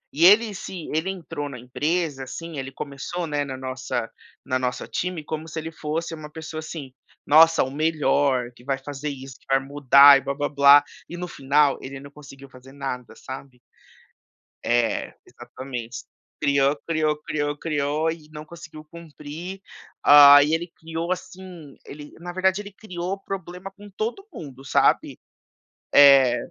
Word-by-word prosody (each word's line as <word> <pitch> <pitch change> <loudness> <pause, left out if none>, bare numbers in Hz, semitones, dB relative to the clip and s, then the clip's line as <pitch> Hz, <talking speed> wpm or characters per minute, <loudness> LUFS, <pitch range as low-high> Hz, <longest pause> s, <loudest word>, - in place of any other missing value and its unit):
e 165 +4 +4
ele 210 +3 +6
se 185 -3 -8
ele 160 +5 -1
entrou 155 -6 -6
na 130 - -8
empresa, 145 +4 -2
assim 165 +4 -8
ele 135 0 -6
começou, 140 +6 -6
né, 145 -2 -2
na 135 -2 -6
nossa 130 -3 -4 0.3
no 130 -1 -1
nosso 125 -1 -3
time 180 -3 -4
como 155 +1 -6
se 160 - -9
ele 160 +1 -6
fosse 160 +1 -4
uma 155 -2 -9
pessoa, 160 0 -8
assim: 155 -4 -8 0.3
"Nossa, 165 +2 +6
o 130 - -5
melhor! 145 -4 +1
Que 120 - -18
vai 135 +1 -1
fazer 145 +2 -6
isso, 135 -2 -9
que - - -29
vai 135 0 +4
mudar 140 0 +6
e - - -4
blá-blá-blá" 140 +1 +4 0.3
e 175 - -7
no 180 0 -5
final 140 -1 +1
ele 135 0 -8
não 140 +1 -12
conseguiu 140 -1 -13
fazer 130 +1 -16
nada, 135 -3 -6
sabe? 130 -1 -10 1.1
É, 120 -1 0
exatamente, 125 -2 -8 0.3
criou, 140 0 +2
criou, 155 -2 +1
criou, 145 -1 -3
criou 150 0 -1
e 160 -2 -10
não 150 0 -9
conseguiu 160 -2 -12
cumprir. 165 +3 -10 0.4
Hã, 145 0 +10
aí, 145 +2 +4
ele 170 +2 -3
criou, 165 +2 -4
assim 180 -5 -9
ele, 145 +1 -11
na 175 +1 -7
verdade, 190 +2 +1
ele 205 - -11
criou 185 -2 -6
problema 190 -1 -7
com 205 +1 -15
todo 230 - -4
mundo, 135 -4 -10
sabe? 140 - +1 0.8
É. 135 -4 +7
150 Hz, 160 wpm, -23 LUFS, 135-165 Hz, 1.1 s, Hã